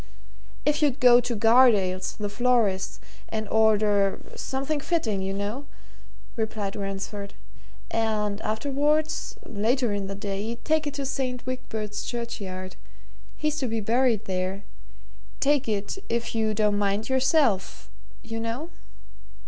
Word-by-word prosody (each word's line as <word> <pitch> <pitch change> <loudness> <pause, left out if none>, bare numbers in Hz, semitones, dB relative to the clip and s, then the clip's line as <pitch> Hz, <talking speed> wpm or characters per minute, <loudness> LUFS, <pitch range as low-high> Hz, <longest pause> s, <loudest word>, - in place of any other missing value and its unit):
"If 295 +1 +2
you'd 290 -2 +2
go 245 -2 +7
to 240 0 -2
Gardales', 215 -5 +4
the 210 - -2
florists, 215 -3 +1 0.3
and 220 -1 -3
order 210 -3 +3 0.2
something 275 +3 -2
fitting, 260 - 0
you 190 0 -2
know," 205 +8 -3 0.7
replied 215 -3 -2
Ransford, 200 0 -5 0.6
"and 215 -2 0
afterwards 290 +7 0
later 230 +2 +1
in 200 -1 -2
the 195 - -4
day 200 +3 -3
take 315 -1 +2
it 290 - -4
to 280 - -3
St. 255 -2 -2
Wigbert's 220 -5 -4
Churchyard 200 -6 -5 0.6
he's 305 0 0
to 260 - 0
be 225 -1 -1
buried 230 0 +2
there 185 +1 -2 0.8
take 285 -2 +2
it 205 - -2
if 235 0 -1
you 220 -1 +1
don't 210 -1 +2
mind 205 +1 0
yourself, 260 - +2 0.3
you 225 0 -4
know." 235 +9 -4
225 Hz, 125 wpm, -26 LUFS, 205-260 Hz, 0.8 s, go